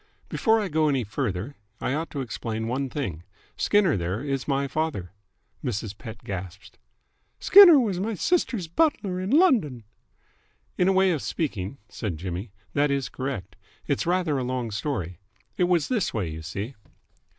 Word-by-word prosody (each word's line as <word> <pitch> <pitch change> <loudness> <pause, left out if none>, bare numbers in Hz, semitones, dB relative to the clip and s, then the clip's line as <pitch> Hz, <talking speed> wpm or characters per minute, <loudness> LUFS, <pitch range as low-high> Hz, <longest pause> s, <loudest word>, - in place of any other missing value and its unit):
"Before 225 -2 +3
I 210 - -1
go 155 -2 +2
any 135 -3 +1
further, 105 +2 -3 0.2
I - - -1
ought 160 +3 -2
to 140 - -4
explain 110 -1 -4
one 130 +3 -1
thing. 120 - -4 0.3
Skinner 200 -6 +3
there 95 +6 -2
is 135 -3 -2
my 140 -1 +1
father." 140 - -2 0.5
Mrs. 110 -5 -3
Pett 110 0 -10
gasped. 95 -1 -7 0.6
"Skinner 370 -7 +9
was 205 -8 0
my 215 +3 -2
sister's 230 - 0
butler 195 - +1
in 185 +1 -3
London." 235 - +3 0.9
"In 180 - +2
a - - +5
way 190 0 +4
of 155 -5 -1
speaking," 120 - -3
said 105 -9 -4
Jimmy, 95 +4 -5 0.2
"that 145 +1 +2
is 140 -1 -1
correct. 130 -9 -5 0.3
It's - - -1
rather 175 -5 +1
a - - -2
long 125 -2 -2
story. 100 - -3 0.4
It 180 - +2
was 175 -3 +2
this 225 - 0
way, 90 -7 -1
you 80 +1 -7
see. 100 - -5
140 Hz, 160 wpm, -26 LUFS, -, 0.9 s, Skinner